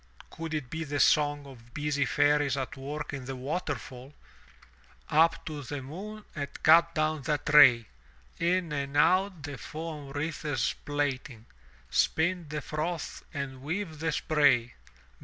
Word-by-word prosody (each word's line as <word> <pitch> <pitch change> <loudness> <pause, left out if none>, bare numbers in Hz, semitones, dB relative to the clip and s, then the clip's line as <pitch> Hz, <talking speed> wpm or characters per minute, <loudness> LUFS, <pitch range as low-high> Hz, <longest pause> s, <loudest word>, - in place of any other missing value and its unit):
Could 165 -1 -5
it 135 -5 -4
be 160 0 -3
the 145 -1 -3
song 145 -1 +3
of 120 -4 -14
busy 145 -1 0
fairies 145 0 +2
at 135 +1 -4
work 145 +2 -5
in 135 -2 -5
the 135 +1 -5
waterfall? 135 -1 -5 0.9
Up 165 +2 +3
to 150 -2 -5
the 140 0 -6
moon 205 +10 -8
and 140 -2 -3 0.2
cut 170 +1 +6
down 155 0 0
that 145 +2 -2
ray! 120 -6 +8 0.5
In 175 -1 +1
and 140 -1 -2
out 185 +1 +3
the 145 -3 -6
foam 155 -3 -7
wreaths 145 -2 -2
plaiting: 135 -5 -3 0.5
Spin 160 - +1
the 150 0 -3
froth 160 +4 -4
and 140 -3 -5
weave 160 +2 -4
the 165 +1 0
spray! 140 -6 +2
145 Hz, 140 wpm, -29 LUFS, 135-160 Hz, 0.9 s, ray